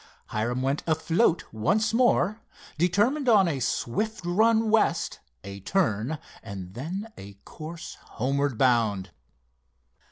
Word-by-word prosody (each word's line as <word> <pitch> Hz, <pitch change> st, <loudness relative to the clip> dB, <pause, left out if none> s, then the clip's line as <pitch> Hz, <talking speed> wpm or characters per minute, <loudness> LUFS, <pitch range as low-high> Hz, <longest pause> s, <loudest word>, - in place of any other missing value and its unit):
Hiram 120 Hz, +4 st, -1 dB
went 135 Hz, +2 st, 0 dB
afloat 160 Hz, +3 st, +2 dB
once 210 Hz, -, +1 dB
more, 225 Hz, -3 st, +2 dB, 0.4 s
determined 220 Hz, -, +2 dB
on 200 Hz, -5 st, +6 dB
a 145 Hz, -5 st, -1 dB
swift 210 Hz, -, -2 dB
run 220 Hz, +4 st, +3 dB
west, 225 Hz, -1 st, +1 dB, 0.2 s
a 100 Hz, +1 st, -8 dB
turn, 135 Hz, -, 0 dB, 0.2 s
and 95 Hz, -4 st, -8 dB
then 175 Hz, -, -5 dB
a 100 Hz, +1 st, -10 dB
course 160 Hz, +2 st, -8 dB
homeward 140 Hz, +1 st, -1 dB
bound. 110 Hz, -8 st, +2 dB
160 Hz, 115 wpm, -26 LUFS, -, 0.4 s, on